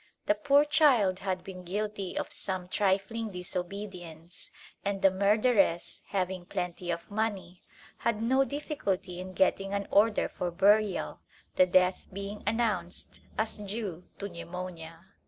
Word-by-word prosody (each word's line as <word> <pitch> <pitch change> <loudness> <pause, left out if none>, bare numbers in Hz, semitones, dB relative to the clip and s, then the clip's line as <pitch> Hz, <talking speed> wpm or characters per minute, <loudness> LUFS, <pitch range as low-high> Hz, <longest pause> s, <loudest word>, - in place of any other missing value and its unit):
The - - +4
poor 280 +7 +4
child 250 - +4
had 185 -2 -2
been 185 -1 -8
guilty 200 +1 -3
of - - -2
some 185 -2 -3
trifling 200 +4 0
disobedience, 180 -2 -6 0.3
and 200 0 -1
the 195 - +7
murderess, 200 -2 +2
having 185 -2 -2
plenty 180 -2 -3
of 170 +2 -3
money, 200 -5 -2 0.4
had 230 -2 0
no 260 +4 +3
difficulty 220 - -3
in 185 0 -6
getting 195 +1 +2
an 200 0 -2
order 210 +1 +4
for 180 - -3
burial, 200 +3 +3 0.4
the 185 - +6
death 180 0 +3
being 200 +2 -5
announced 210 -6 -1 0.2
as 220 0 0
due 200 -4 -5
to 200 - -4
pneumonia. 170 -1 -7
195 Hz, 135 wpm, -30 LUFS, 180-210 Hz, 0.4 s, the